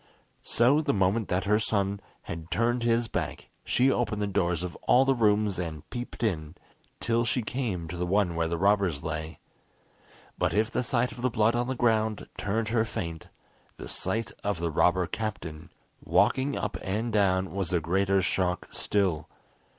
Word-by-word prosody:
So 130 +6 +3
the 145 -5 0
moment 95 +3 +1
that 90 +1 0
her 105 +2 +3
son 100 -2 0 0.2
had 80 0 -7
turned 120 +4 +1
his 115 0 +2
back, - - -4
she 130 +3 +3
opened 115 -4 0
the 105 - 0
doors 90 -4 0
of 90 - -5
all 130 +2 +6
the 135 - +4
rooms, 105 -5 +2
and 80 -3 -5
peeped 120 -1 -6
in, 80 -7 -1 0.4
till 115 0 +1
she 120 +1 0
came 105 -8 -3
to 85 - -6
the 90 0 -2
one 95 -1 +2
where 85 0 +1
the 85 +1 -2
robbers 95 -5 +2
lay. 80 0 -4 1.0
But - - +1
if 110 +3 +2
the - - 0
sight 125 0 0
of 120 - -9
the 130 - +2
blood 110 0 +2
on 120 0 0
the 130 - -2
ground 110 -3 +1
turned 110 +2 -1
her 110 -1 +2
faint, 85 -7 -5 0.5
the - - -8
sight 115 +1 -2
of 100 -4 -1
the 85 -1 -1
robber 90 +3 +3
captain 90 -6 -5 0.3
walking 135 +2 +2
up 105 - -3
and 110 +4 -2
down 95 -2 +2
was 95 -4 -2
a 90 - +2
greater 95 +4 +1
shock 90 0 0
still. 95 -7 0
100 Hz, 180 wpm, -28 LUFS, 90-115 Hz, 1.0 s, all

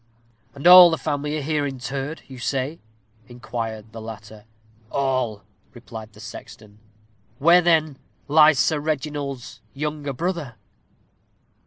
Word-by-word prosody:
"And 140 - -9
all 180 0 +10
the 165 - -1
family 150 0 -3
are 150 - -4
here 150 0 -1
interred, 135 +2 -5
you 130 -2 -11
say?" 135 +5 -2 0.5
inquired 115 -3 -6
the 115 0 -9
latter. 110 -1 -10 0.4
"All," 130 -7 -1 0.3
replied 110 -3 -10
the 105 - -17
sexton. 105 -1 -12 0.6
"Where, 170 +6 +5
then, 155 -5 +1 0.3
lies 155 0 +6
Sir 155 +1 +2
Reginald's 145 -3 -4
younger 150 0 -4
brother?" 160 -4 -4
140 Hz, 120 wpm, -23 LUFS, 115-155 Hz, 0.6 s, all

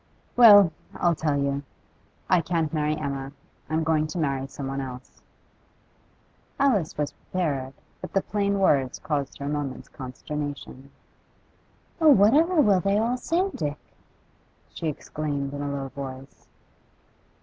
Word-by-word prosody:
'Well, 205 -7 +9 0.2
I'll 175 -1 +2
tell 150 -2 0
you. 140 0 0 0.7
I 180 -2 +4
can't 165 -1 -1
marry 150 -1 0
Emma; 140 -2 -4 0.4
I'm 160 +1 0
going 155 -1 +1
to 155 - -6
marry 135 -4 -1
someone 135 0 -5
else.' 130 -1 -9 1.4
Alice 220 - +2
was 150 -1 -1
prepared, 140 -7 -3 0.3
but - - -7
the 195 - +2
plain 200 -1 0
words 140 -9 +2
caused 145 -3 -3
her 140 - -6
a - - -3
moment's 145 -3 -4
consternation. 140 +1 -7 1.1
'Oh, 320 -2 +6
what 215 -4 +6
ever 330 +3 +4
will 200 -7 +4
they 195 +3 +1
all 230 +3 +1
say, 345 +9 0
Dick?' 145 -2 -3 1.0
she 165 - -4
exclaimed 145 -2 -3
in 145 - -4
a 145 - -2
low 135 -1 -4
voice. 135 0 -9
150 Hz, 140 wpm, -25 LUFS, 140-195 Hz, 1.4 s, Well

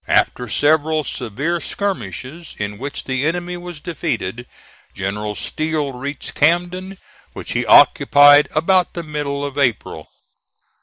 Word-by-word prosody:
After 125 -2 +1
several 155 +6 +2
severe 145 +9 -3
skirmishes, 160 - -5
in 105 0 -5
which 140 +2 -5
the 130 0 -2
enemy 175 +3 -2
was 175 -2 -8
defeated, 135 - -4 0.5
General 105 +2 -3
Steele 155 -1 -2
reached 140 +3 -6
Camden, 180 +4 0 0.4
which - - -8
he - - -1
occupied 145 +1 +7
about 180 +3 +2
the 170 - -4
middle 145 -2 -3
of 140 0 -5
April. 125 -7 -1
145 Hz, 120 wpm, -19 LUFS, 130-170 Hz, 0.5 s, occupied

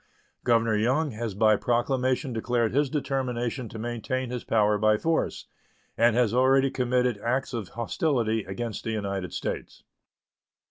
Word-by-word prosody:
Governor 115 -2 +3
Young 130 +8 +1
has 110 -2 -4
by 110 +1 +4
proclamation 125 +2 0
declared 115 0 0
his 145 +1 +2
determination 130 -4 -2
to - - -8
maintain 120 +2 -3
his 125 -1 -4
power 105 -2 +2
by 110 0 +4
force, 160 +7 -1 0.5
and 115 0 +4
has 120 -3 +2
already 135 +2 +4
committed 125 -3 +1
acts 130 +4 -1
of 115 -5 -3
hostility 115 - -1
against 110 +3 -5
the - - -3
United 100 -4 -3
States. - - -5
120 Hz, 140 wpm, -27 LUFS, 110-130 Hz, 0.5 s, by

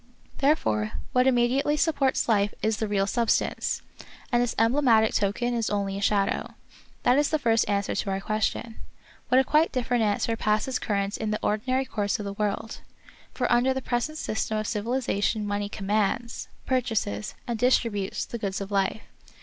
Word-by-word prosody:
Therefore 110 - +1 0.2
what 250 +1 +3
immediately 260 +4 +2
supports 280 -4 +1
life 205 -3 +2
is 220 -1 +1
the 220 - -1
real 200 -1 +1
substance, 230 +3 0 0.5
and 240 -1 +3
its 245 -1 -1
emblematic 225 -2 +4
token 210 +5 0
is 230 -2 0
only 200 -1 -1
a 200 - -4
shadow. 200 -1 0 0.5
This 275 +4 +4
is - - -4
the 310 - +2
first 230 -6 +2
answer 200 -1 0
to - - -2
our 195 0 -1
question. 220 +2 -2 0.5
But 250 - +4
a 265 - +6
quite 305 +4 +3
different 245 -2 0
answer 215 +2 +1
passes 215 +4 0
current 200 -1 -1
in 220 - -2
the 215 - 0
ordinary 255 +5 0
course 205 -4 -1
of 210 - -6
the 200 - -4
world. 210 +2 -3 0.5
For 250 - -1
under 250 +2 +3
the 265 - -2
present 245 +6 -1
system 220 -4 -2
of 215 - -2
civilization 215 -1 -1
mon^y 205 0 -2
commands 210 +3 -1 0.2
^ - - -30
purchases, 225 - -1
and 235 -2 -3
distributes, 230 -5 +1
the 235 - -6
goods 195 -3 -2
of 200 0 -6
life. 195 +2 0
220 Hz, 175 wpm, -26 LUFS, 205-250 Hz, 0.5 s, a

